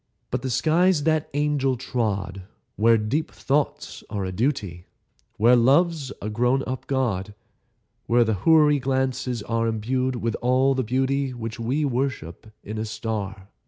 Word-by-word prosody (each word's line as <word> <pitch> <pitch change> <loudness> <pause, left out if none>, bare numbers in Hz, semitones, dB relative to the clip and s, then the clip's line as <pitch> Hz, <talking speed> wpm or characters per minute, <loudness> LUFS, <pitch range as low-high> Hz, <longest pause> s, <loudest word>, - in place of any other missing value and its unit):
But 125 - -1
the 130 - -3
skies 160 +5 +2
that 155 -1 +1
angel 145 -3 +1
trod, 100 -7 -3 0.3
Where 115 +2 +4
deep 115 +9 -1
thoughts 145 +1 -2
are 100 -2 -3
a 95 - -3
duty, 100 - -2 0.5
Where 120 +3 +5
Love's 140 +3 +3
a - - -3
grown 125 +5 +1
up 130 +1 -5
God, 105 -7 -1 0.7
Where 120 +1 +4
the 110 -1 0
Houri 150 -3 +5
glances 130 -3 -1
are 115 +1 -1
Imbued 125 +4 -1
with 115 -1 -2
all 130 +2 +3
the 130 - 0
beauty 130 +2 0
Which 115 -2 -6
we 130 +7 0
worship 120 - -3 0.2
in 110 +2 -5
a 110 - -2
star. 100 -3 -5
125 Hz, 150 wpm, -24 LUFS, 110-135 Hz, 0.7 s, Where